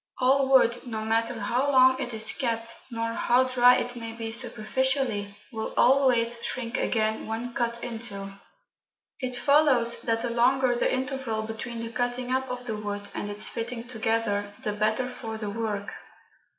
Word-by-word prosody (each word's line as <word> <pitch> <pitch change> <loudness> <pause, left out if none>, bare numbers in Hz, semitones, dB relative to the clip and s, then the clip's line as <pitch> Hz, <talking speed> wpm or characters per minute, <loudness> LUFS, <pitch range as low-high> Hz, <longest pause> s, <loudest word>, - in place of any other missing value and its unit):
All 265 +1 +3
wood, 245 -2 +4
no 220 -2 -4
matter 225 +1 0
how 245 +7 0
long 260 -1 +5
it 250 -2 -3
is 220 -1 +2
kept, 230 -2 -2 0.2
nor 230 -1 -3
how 245 +2 +3
dry 250 -1 +5
it 245 0 -2
may 230 -1 -6
be 225 -1 -5
superficially, 230 -2 -1 0.2
will 220 -2 -5
always 240 -3 +4
shrink 240 -1 -3
again 220 -3 0
when 230 +2 -4
cut 235 0 -2
into. 215 -5 -5 0.9
It 255 -2 +1
follows 260 -3 +3
that 225 -1 0
the 240 - -1
longer 250 +2 +3
the 240 - +1
interval 260 -4 -2
between 225 +2 -6
the 230 - -6
cutting 245 +1 -2
up 265 0 -2
of 250 0 -5
the 220 -3 -3
wood, 205 -1 -5
and 205 - -4
its 205 +1 +2
fitting 235 +1 -4
together, 220 -3 -1
the 210 -3 -1
better 215 +4 0
for 225 -3 -6
the 210 -2 -4
work. 210 -2 -3
235 Hz, 165 wpm, -26 LUFS, 220-255 Hz, 0.9 s, long